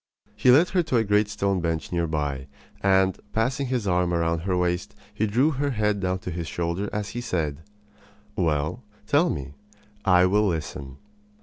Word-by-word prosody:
He 115 +4 +2
led 150 +8 +6
her 185 - +2
to 155 -7 0
a 115 - +3
great 105 0 +2
stone 100 -3 0
bench 80 -3 -2
near 85 -1 0
by; 70 -4 -2 0.3
and, 95 -1 +3
passing 130 +5 0
his 125 -4 -1
arm 90 -1 +2
about 85 -1 0
her 90 -2 +1
waist, 90 0 -1 0.2
he 110 - 0
drew 125 +9 +2
her 145 0 -1
head 105 -4 0
down 95 -1 -1
to 90 - -3
his 85 -1 -4
shoulder 85 +4 -2
as 105 -1 -3
he 120 - -5
said: 80 -10 -2 0.7
"Well, 80 - -1 0.2
tell 145 +10 +3
me. 70 -2 -4 0.5
I 90 -2 +5
will 105 +3 +3
listen." 70 -5 -4
95 Hz, 180 wpm, -25 LUFS, 85-110 Hz, 0.7 s, led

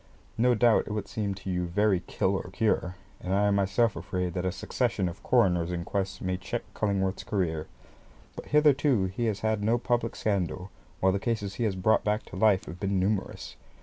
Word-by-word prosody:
No 120 +2 +3
doubt 115 +1 +4
it - - -5
will 105 -2 -2
seem 100 -3 -3
to 95 0 -8
you 90 -1 -1
very 100 +1 +2
kill 95 +1 -1
or 95 - -3
cure, 95 -5 0 0.2
and 90 +1 -2
I 100 +1 +3
am - - +2
myself 100 +3 +2
afraid 90 -2 -3
that 90 +1 -1
a - - 0
succession 110 0 -1
of 85 +1 -7
coroners' 90 -8 +2
inquests 95 +3 -3
may 95 0 -1
check 95 - -4
Cullingworth's 100 -2 -1
career; 80 -6 -1 0.7
but - - -8
hitherto 145 -7 +4
he 95 +6 -2
has 100 -2 -2
had 110 -1 0
no 115 +3 +3
public 120 -1 -1
scandal, 95 -2 -2 0.3
while 95 - +4
the 100 - 0
cases 105 -2 -2
which 100 - -12
he 120 - 0
has 100 -3 0
brought 100 +4 +2
back 105 +1 0
to - - -11
life 100 -1 +3
have 85 - -9
been 100 -1 0
numerous. 95 +1 -2
100 Hz, 205 wpm, -28 LUFS, 95-110 Hz, 0.7 s, doubt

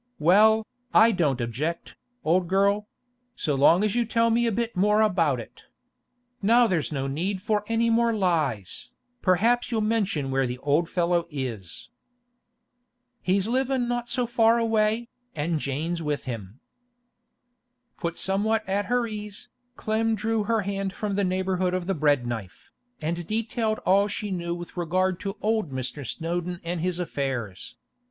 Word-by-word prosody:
Well, 215 +7 +5 0.3
I 230 +1 +7
don't 150 - +1
object, 135 +9 -3 0.3
old 175 +3 +2
girl—so 205 +2 -1
long 155 +8 +5
as 210 -2 +1
you 240 - +2
tell 230 0 +2
me 235 +1 +2
a - - +1
bit 235 +2 -2
more 210 +3 +3
about 165 - +2
it. 115 - -11 0.8
Now 235 +4 +5
there's 175 -9 0
no 135 -2 -2
need 175 +8 -2
for 210 +1 0
any 230 0 +2
more 235 0 +3
lies, 165 - -1 0.3
perhaps 225 +7 +2
you'll 225 -2 0
mention 200 -11 0
where 135 -1 +1
the 125 +1 -4
old 145 +5 +1
fellow 175 -1 +1
is.' 120 - -6 1.3
'He's 190 +2 +1
livin' 260 0 0
not 240 0 -2
so 250 - 0
far 230 -1 +3
away, 225 0 +1 0.3
an' 160 +1 -1
Jane 150 +5 -2
with 150 -1 -2
him.' 115 -2 -7 1.4
Put 170 -2 -3
somewhat 210 +3 0
at 200 +1 0
her 245 0 +1
ease, 210 -2 -7 0.3
Clem 220 0 0
drew 220 0 -1
her 225 0 +1
hand 195 -1 -3
from 210 -1 -3
the 200 +1 +1
neighbourhood 185 -1 0
of 185 -1 -2
the 195 - 0
bread 145 -6 +2
knife, 110 -6 -6 0.3
and 170 +2 -3
detailed 220 0 -1
all 200 +2 +4
she 205 0 -4
knew 170 -2 -2
with 175 0 -9
regard 180 +2 0
to 195 +1 -5
old 215 -5 +1
Mr. 130 +2 -4
Snowdon 175 +4 -3
and 170 0 -3
his 180 0 -1
affairs. 130 - -4
190 Hz, 155 wpm, -26 LUFS, 160-220 Hz, 1.4 s, I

